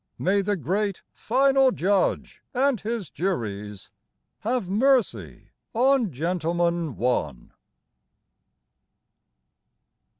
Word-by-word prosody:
May 200 +2 +1
the 205 +1 0
great 195 - -2
Final 270 +2 +3
Judge 195 -2 0
and 260 -3 +2
His 225 -2 -4
juries 105 - -4 0.5
Have 235 -2 -1
mercy 245 +4 +1 0.3
on 250 -3 +3
"Gentleman, 170 0 -1
One"! 75 - -2
195 Hz, 75 wpm, -25 LUFS, 165-240 Hz, 0.5 s, Final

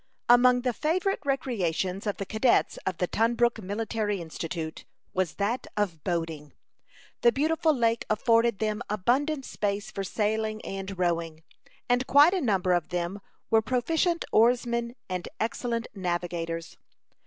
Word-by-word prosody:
Among 245 +1 +6
the 250 -1 0
favorite 365 - 0
recreations 200 - -1
of 205 - -1
the 195 - -4
cadets 220 +5 +2
of 185 -3 -1
the 180 - +1
Tunbrook 235 +3 +1
Military 210 0 -2
Institute 165 -1 -5 0.3
was 185 -4 -1
that 215 +5 -1
of 175 -8 -1
boating. 165 -4 -3 0.7
The 235 - +6
beautiful 315 +4 +2
lake 230 -4 +1
afforded 230 +1 +3
them 215 +1 -1
abundant 265 +8 0
space 200 0 -2
for 195 - -4
sailing 215 +2 -1
and 195 0 -5
rowing, 165 -3 -1 0.4
and 245 +1 +1
quite 290 +6 +7
a 375 - 0
number 190 -6 +2
of 175 -2 0
them 175 +3 -2 0.3
were 225 0 +5
proficient 320 +9 0
oarsmen 235 +1 +2
and 180 -1 -4
excellent 230 +1 -2
navigators. 175 -3 -3
215 Hz, 135 wpm, -27 LUFS, 180-245 Hz, 0.7 s, quite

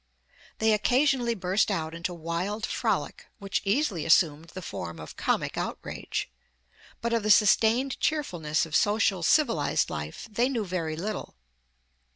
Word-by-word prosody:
They 220 0 +3
occasionally 245 +2 +2
burst 190 +2 +1
out 160 -5 -2
into 170 +2 -4
wild 175 +6 -3
frolic, - - -2
which 195 -1 -2
easily 205 - 0
assumed 160 -1 +3
the 185 - -8
form 85 - -6
of 75 - -9
comic - - -1
outrage, - - -4 0.7
but 235 0 -1
of 230 - +2
the 215 - -2
sustained 225 +6 +4
cheerfulness 175 - 0
of 160 -1 -5
social 205 -3 +2
civilized 230 - +2
life 75 - -6
they 240 +5 +1
knew 235 -6 -1
very 170 -4 -3
little. 200 +5 -5
195 Hz, 140 wpm, -27 LUFS, 165-230 Hz, 0.7 s, sustained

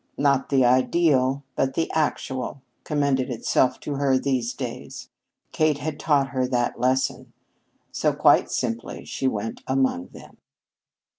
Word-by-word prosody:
Not 140 -1 +2
the 135 -3 +4
ideal 130 +1 +2
but 135 0 0
the 165 - 0
actual 135 -4 -2 0.2
commended 140 -4 0
itself 125 +1 +1
to 145 -2 -4
her 135 -2 +2
these 130 -3 -1
days. - - -7 0.4
Kate 155 -2 +2
had 145 +1 -5
taught 140 -4 +2
her 130 -2 -1
that 120 -1 -1
lesson. 130 +1 0 0.6
So, - - +1
quite - - +4
simply, 115 -1 -3
she 135 - -2
went 110 -2 -3
among 130 -9 0
them. - - -15
130 Hz, 135 wpm, -24 LUFS, 125-140 Hz, 0.6 s, the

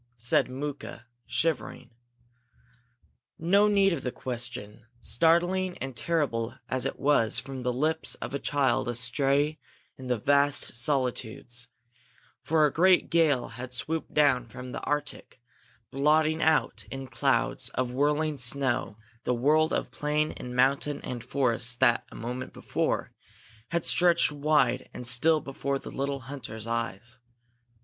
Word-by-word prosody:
said 115 +2 +2
Mooka, 135 -2 -6 0.2
shivering. 150 +3 -2 1.5
No 200 +6 +4
need 200 -2 +4
of 150 - -3
the 125 - -3
question, 120 -3 -6
startling 175 - +1
and 135 -1 -6
terrible 140 -9 -1
as 130 0 0
it - - -6
was 140 -6 +2
from 135 -1 -5
the 125 0 0
lips 155 +6 0
of - - -7
a 140 - -1
child 135 -6 +1
astray 140 +5 0 0.4
in 130 - -8
the 125 -1 +1
vast 140 +4 +2
solitudes; 120 -2 -1 0.7
for 155 -1 +3
a 145 - 0
great 185 +2 +4
gale 155 -7 +2
had 125 +2 -8
swooped 160 +5 -3
down 135 -5 +3
from 125 +2 -9
the - - -5
Arctic, 145 -3 -4 0.5
blotting 155 +3 +2
out 160 0 +2
in 135 0 -6
clouds 130 0 0
of 130 -1 -1
whirling 150 +2 0
snow 130 -4 0 0.3
the 125 - 0
world 155 +6 +3
of - - -2
plain 150 +1 0
and 125 0 -8
mountain 140 +3 +2
and 120 -2 -5
forest 125 -2 0
that, 120 -3 +3
a - - -11
moment 125 +2 -5
before, - - -2 0.6
had 170 -1 -1
stretched 175 -3 +4
wide 145 -4 +1
and 125 - -5
still 140 +7 +4
before 140 -1 -3
the - - -9
little 140 0 -3
hunters' 120 -4 -8
eyes. 115 0 -4
135 Hz, 140 wpm, -28 LUFS, 125-150 Hz, 1.5 s, No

